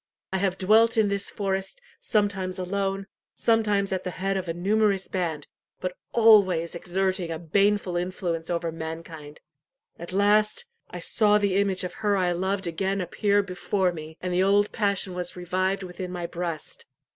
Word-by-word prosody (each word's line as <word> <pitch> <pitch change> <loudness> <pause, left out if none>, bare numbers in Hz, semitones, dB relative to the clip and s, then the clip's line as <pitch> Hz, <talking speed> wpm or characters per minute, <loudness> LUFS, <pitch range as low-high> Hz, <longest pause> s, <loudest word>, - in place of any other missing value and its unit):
I - - +2
have 190 -1 0
dwelt 225 +4 +4
in 215 -2 +4
this 200 0 0
forest, 195 - -3 0.2
sometimes 195 -3 0
alone, 195 +1 -2 0.3
sometimes 210 -4 +2
at 185 - -2
the 185 - -3
head 195 +1 -1
of 190 -2 -3
a - - 0
numerous 200 +1 +1
band, 165 -6 -2 0.3
but 180 0 -3 0.2
always 200 -7 +5
exerting 185 0 -1
a 165 - -3
baneful 195 +3 +1
influence 175 -2 -2
over 170 -1 -1
mankind. 160 -2 -8 0.6
At 170 +1 -7
last, 210 - +2 0.2
I - - -7
saw 210 -2 +3
the 200 -2 +1
image 195 -2 +1
of 180 - -4
her 205 -2 +2
I 180 -2 +1
loved 190 +2 -1
again 190 +4 -1
appear 205 +2 +1
before 190 0 0
me, 160 -1 -9
and 180 -1 -2
the 180 - +2
old 205 +2 +3
passion 200 -3 0
was 180 -1 -5
revived 185 +2 -1
within 180 0 -6
my 175 -1 -4
breast. 170 -2 -5
190 Hz, 165 wpm, -26 LUFS, 175-200 Hz, 0.6 s, always